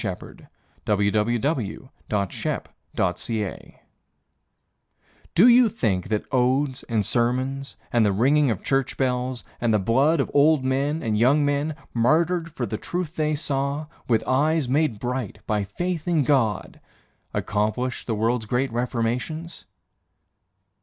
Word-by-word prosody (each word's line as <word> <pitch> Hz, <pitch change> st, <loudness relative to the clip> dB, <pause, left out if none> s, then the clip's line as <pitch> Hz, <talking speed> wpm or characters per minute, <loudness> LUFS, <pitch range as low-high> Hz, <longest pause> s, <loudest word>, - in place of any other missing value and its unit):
Sersmith -, -, -6 dB, 0.4 s
the 110 Hz, +5 st, 0 dB, 0.2 s
Dentist 95 Hz, -2 st, -3 dB, 2.1 s
Do 200 Hz, +8 st, +7 dB
you 245 Hz, -1 st, +7 dB
think 95 Hz, -, -1 dB
that 105 Hz, -1 st, -1 dB
odes 130 Hz, +1 st, +1 dB
and 110 Hz, -4 st, -1 dB
sermons, 130 Hz, +3 st, -1 dB, 0.2 s
And 120 Hz, -2 st, +4 dB
the 105 Hz, -, +3 dB
ringing 135 Hz, +8 st, +3 dB
of 110 Hz, -5 st, -2 dB
church 135 Hz, -1 st, 0 dB
bells, 125 Hz, -3 st, -1 dB, 0.2 s
And 120 Hz, -1 st, +2 dB
the 105 Hz, -, +4 dB
blood 135 Hz, -, +2 dB
of 135 Hz, -, -1 dB
old 145 Hz, -1 st, +4 dB
men 140 Hz, +4 st, 0 dB
and 105 Hz, -2 st, 0 dB
young 140 Hz, +5 st, +4 dB
men, 145 Hz, +2 st, 0 dB, 0.2 s
Martyred 165 Hz, +8 st, +2 dB
for -, -, -3 dB
the -, -, -4 dB
truth 175 Hz, -2 st, -4 dB
they 155 Hz, -1 st, 0 dB
saw 140 Hz, +1 st, -2 dB, 0.2 s
With 115 Hz, -3 st, +2 dB
eyes 150 Hz, +2 st, +2 dB
made 135 Hz, -4 st, +1 dB
bright 125 Hz, -4 st, -3 dB
by 105 Hz, -1 st, 0 dB
faith 175 Hz, -, -3 dB
in 165 Hz, -4 st, +2 dB
God, 115 Hz, -9 st, 0 dB, 0.5 s
Accomplished 110 Hz, +5 st, -2 dB
the 115 Hz, -, 0 dB
world's 110 Hz, +1 st, 0 dB
great 125 Hz, +2 st, 0 dB
reformations? 125 Hz, +8 st, -3 dB
130 Hz, 125 wpm, -24 LUFS, 115-150 Hz, 2.1 s, Do